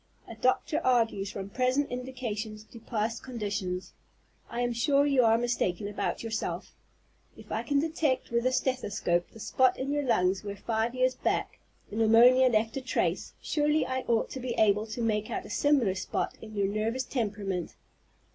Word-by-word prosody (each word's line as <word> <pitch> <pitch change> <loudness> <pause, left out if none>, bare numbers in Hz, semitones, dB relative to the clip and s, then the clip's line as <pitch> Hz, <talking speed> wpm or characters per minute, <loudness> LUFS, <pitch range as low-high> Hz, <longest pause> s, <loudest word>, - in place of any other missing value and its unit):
A - - -8
doctor 255 +6 +1
argues 225 -6 +2
from 195 -1 -6
present 255 +5 +1
indications 235 -4 -5
to 230 +2 -13
past 225 0 -2
conditions. 205 -7 -4 0.6
I 240 - -3
am 240 0 0
sure 280 +4 +3
you 275 -3 +4
are 225 0 +5
mistaken 215 -5 -1
about 205 +2 -3
yourself. 225 -1 -3 0.6
If - - -13
I - - 0
can 285 - 0
detect 310 -5 0
with 235 +1 +1
the 255 - +3
stethoscope 205 -10 0
the 225 - -14
spot 255 +3 +2
in 270 +2 -2
your 290 0 +1
lungs 190 -7 +1
where 200 -1 -5
five 225 +3 -1
years 255 0 +2
back - - -2 0.3
pneumonia 230 +4 +6
left 220 -2 +1
a - - -2
trace, 260 - -1
surely 300 0 +1
I 260 0 -1
ought 230 -1 +1
to 265 - -5
be 245 -2 -3
able 210 0 +3
to 225 +2 -4
make 215 -1 0
out - - -3
a - - -9
similar 270 -7 +3
spot 185 - -3
in 215 -1 -10
your 200 -1 +1
nervous 220 +5 -1
temperament. 205 - -3
230 Hz, 175 wpm, -29 LUFS, 210-255 Hz, 0.6 s, pneumonia